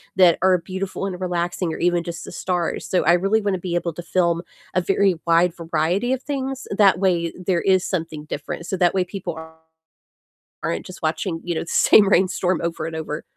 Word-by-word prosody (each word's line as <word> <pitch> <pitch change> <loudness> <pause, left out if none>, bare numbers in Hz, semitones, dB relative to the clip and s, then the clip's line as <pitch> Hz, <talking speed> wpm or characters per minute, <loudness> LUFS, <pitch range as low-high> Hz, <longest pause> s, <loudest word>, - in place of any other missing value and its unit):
that 180 -3 +5
are 185 0 +4
beautiful 190 +2 -5
and 185 -2 -4
relaxing, 175 -1 -1
or - - -5
even 175 0 +2
just 170 -1 -6
the - - -9
stars, 180 -2 -2
so 185 - +1
I 170 - +5
really 195 +5 +2
wanna 200 -3 -1
be 175 -1 -3
able 170 -1 -1
to 175 - -7
film 170 -1 +1 0.3
a - - +3
very 190 +1 +2
wide 170 +1 +4
variety 175 +8 0
of 260 0 -3
things, 270 -2 -4
that 200 -3 +4
way 175 -3 +1
there 180 -1 0
is 185 -1 +3
something 160 -4 -3
different, 155 +3 -5
so 190 - -3
that 175 -1 +3
way 185 - +3
people 180 -3 -6 1.3
aren't 85 - -2
just 185 0 -11
watching, 165 +1 -1
you 175 - -2
know, - - -1
the - - -9
same 205 -2 +5
rainstorm 185 -2 +2
over 165 -2 -3
and 165 - -6
over. 155 -1 -4
180 Hz, 200 wpm, -22 LUFS, 170-190 Hz, 1.3 s, that